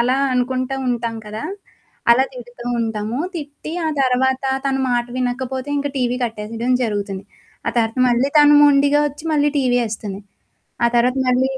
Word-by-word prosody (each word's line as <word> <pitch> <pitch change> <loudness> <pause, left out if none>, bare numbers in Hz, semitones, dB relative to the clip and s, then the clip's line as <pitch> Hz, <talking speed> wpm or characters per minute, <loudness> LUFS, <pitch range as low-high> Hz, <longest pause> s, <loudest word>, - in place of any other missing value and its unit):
అలా 250 +2 +2 0.2
అనుకుంటా 255 +1 -1
ఉంటాం 235 -2 -2
కదా! 215 +1 -6 0.7
అలా 250 +3 +6
తిడుతూ 240 -1 -10 0.2
ఉంటాము. 220 +1 -2 0.2
తిట్టి, 295 0 -7
ఆ - - +1
తర్వాత 260 0 +1 0.2
తను 270 -1 0
మాట 240 0 +1
వినకపోతే, 255 +1 -2
ఇంక 285 - -1
టీవీ 250 -1 0
కట్టేసేయడం 225 +2 -3
జరుగుతుంది. 200 -4 -3 0.4
ఆ - - +2
తరత 225 +1 0
మళ్ళీ 245 +3 +2
తను 295 0 +7
మొండిగా 285 0 +5
ఒచ్చి, 290 +2 -12
మళ్ళీ 295 -1 +3
టీవీ 250 -2 +2
ఏస్తుంది. 205 -2 -5 0.6
ఆ - - +6
తర్వాత 250 +2 +3
మళ్ళీ 255 +1 +2
250 Hz, 150 wpm, -20 LUFS, 230-265 Hz, 0.7 s, తను